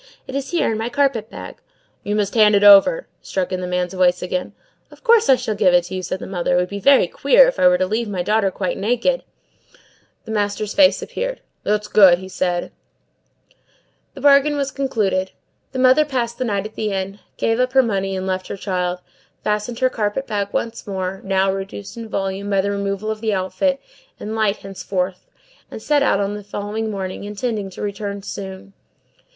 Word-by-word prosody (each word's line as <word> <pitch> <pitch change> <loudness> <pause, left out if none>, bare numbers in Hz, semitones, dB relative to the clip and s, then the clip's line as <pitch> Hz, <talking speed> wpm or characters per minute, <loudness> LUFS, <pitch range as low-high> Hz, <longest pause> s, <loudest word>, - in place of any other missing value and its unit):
It - - -9
is 275 0 -3
here, 340 -8 +1
in 220 - -2
my 225 +2 -2
carpet 250 -5 0
bag." - - -9 0.5
"You 205 - -2
must 205 -2 0
hand 215 -2 +5
it 200 - +3
over," 205 - +7 0.2
struck 190 -1 -3
in 185 0 -2
the 180 - -3
man's 180 0 -2
voice 180 -1 +2
again. 180 0 -3 0.4
"Of - - -18
course 460 -2 +4
I 265 - +8
shall 220 - -3
give 195 -4 +3
it 175 - +4
to 175 +2 -9
you," 185 - -3
said 185 - -3
the - - -8
mother. 180 -2 -1
"It - - +3
would 180 0 0
be 200 - -5
very 275 +6 +5
queer - - +5
if - - -2
I 180 - +6
were 180 0 +5
to 185 - +1
leave 220 +3 -2
my 185 -3 -2
daughter 210 0 +2
quite 190 0 -3
naked!" 245 - +1 1.0
The - - -7
master's 205 0 -1
face 285 -1 +4
appeared. - - -4 0.2
"That's 210 0 -1
good," 190 -3 +5
said 175 -2 -1 0.9
he. - - -30 0.6
The 275 - -9
bargain 285 +1 +5
was 280 -1 -1
concluded. 205 -9 -1 0.4
The 260 - -6
mother 260 +4 +5
passed 245 -5 -3
the 255 - 0
night 200 -3 -1
at 215 - -7
the 215 -1 -2
inn, 195 +1 -4 0.2
gave 225 +1 0
up 255 +1 +1
her 265 -1 +6
money 195 -4 -1
and 185 0 -3
left 185 0 -2
her - - -5
child, 180 -2 -2 0.4
fastened 210 +3 -1
her 255 - +4
carpet 215 +5 -2
bag 205 -4 -2
once 230 -1 -3
more, 190 -1 -4
now 190 0 +1
reduced 195 +1 -7
in 230 -1 -8
volume 195 0 -3
by 195 -1 +2
the 200 +1 -1
removal 200 +1 -2
of 215 0 -6
the 220 -3 0
outfit, 270 +9 0 0.4
and 215 +1 -5
light 215 -2 +1
henceforth 190 -1 -4 0.4
and - - -8
set 290 +6 +1
out 240 -8 +2
on 200 0 -1
the 210 0 -7
following 205 +2 -4
morning, 190 -2 -5
intending 210 0 -3
to 190 - -8
return 200 -1 -4
soon. 190 0 -8
205 Hz, 205 wpm, -20 LUFS, 190-235 Hz, 1.0 s, I